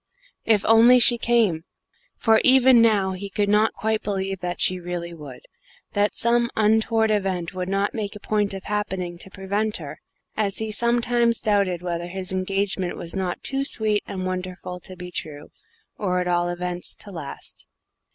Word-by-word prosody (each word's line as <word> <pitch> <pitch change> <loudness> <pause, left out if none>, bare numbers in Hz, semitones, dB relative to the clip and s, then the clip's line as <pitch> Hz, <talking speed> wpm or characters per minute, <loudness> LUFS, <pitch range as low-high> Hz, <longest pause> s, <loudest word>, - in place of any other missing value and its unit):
If 215 -3 +4
she - - -10
only 230 +3 +7
came! 230 -8 +4 0.5
For 220 0 +3
even 260 -2 +6
now 205 -4 +3
he 195 +2 -6
could 205 +1 -1
not 210 +2 +3
quite 220 0 -1
believe 195 -2 -3
that 180 0 -4
she 185 0 +1
really 175 -1 -5
would; 145 -6 -10 0.5
that 205 0 +1
some 235 0 +2
untoward 220 +1 +2
event 190 -4 -1
would 185 0 -4
not 195 +1 0
make 210 -3 -4
a - - -8
point 205 -1 -1
of 195 - -7
happening 190 -4 -3
to 190 - -8
prevent 200 +3 -2
her, - - -9 0.4
as 200 -2 -1
he 220 -1 -3
sometimes 235 +1 +2
doubted 200 -4 0
whether 175 -1 -3
his 185 +1 -3
engagement 190 -1 -1
was 170 +1 -4
not 185 -2 -3
too 270 0 -1
sweet 215 -6 +1
and 185 -1 -5
wonderful 185 0 -5
to 185 +1 -10
be 180 0 -9
true 150 -3 -6 0.5
or, 180 -3 0
at 180 - -2
all 175 0 +1
events, 175 0 -2
to 205 - -11
last. 155 -6 -7
195 Hz, 170 wpm, -23 LUFS, 180-220 Hz, 0.5 s, only